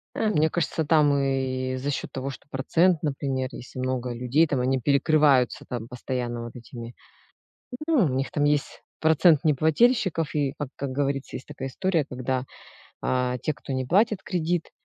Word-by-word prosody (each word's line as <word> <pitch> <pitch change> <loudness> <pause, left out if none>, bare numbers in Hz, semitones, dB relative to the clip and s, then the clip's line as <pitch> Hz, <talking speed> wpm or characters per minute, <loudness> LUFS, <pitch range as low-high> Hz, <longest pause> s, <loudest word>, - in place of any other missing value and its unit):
А 220 - +1
мне 160 -5 +2
кажется 160 -1 -1
там 150 -2 +4
и 130 -1 -1
за 140 +3 -3
счёт - - -4
того, 135 +1 -4
что 135 - -10
процент, 165 +5 +2
например, 135 -3 -2
если 130 +1 -9
много 130 -1 -2
людей, 125 +7 +2
там 140 -4 0
они 130 +1 +1
перекрываются 140 -1 +3
там 120 -2 -5
постоянно 120 -1 -4
вот 120 - -9
этими. 120 0 -9 0.9
Ну 300 - +4
у - - +1
них 135 +1 -1
там 145 - +1
есть 145 -1 0 0.2
процент 160 0 +4
неплательщиков, 160 - +2
и 140 -2 0
как 145 -3 -3
как 140 -1 -4
говорится, 140 0 -2
есть 130 - -9
такая 135 - -6
история, 170 +1 0
когда, 130 -1 -3 0.6
а, 125 0 0
те, 155 - -1
кто 135 - -7
не 130 -1 -1
платит 200 - +2
кредит, 175 -2 -1
140 Hz, 170 wpm, -25 LUFS, 130-155 Hz, 0.9 s, там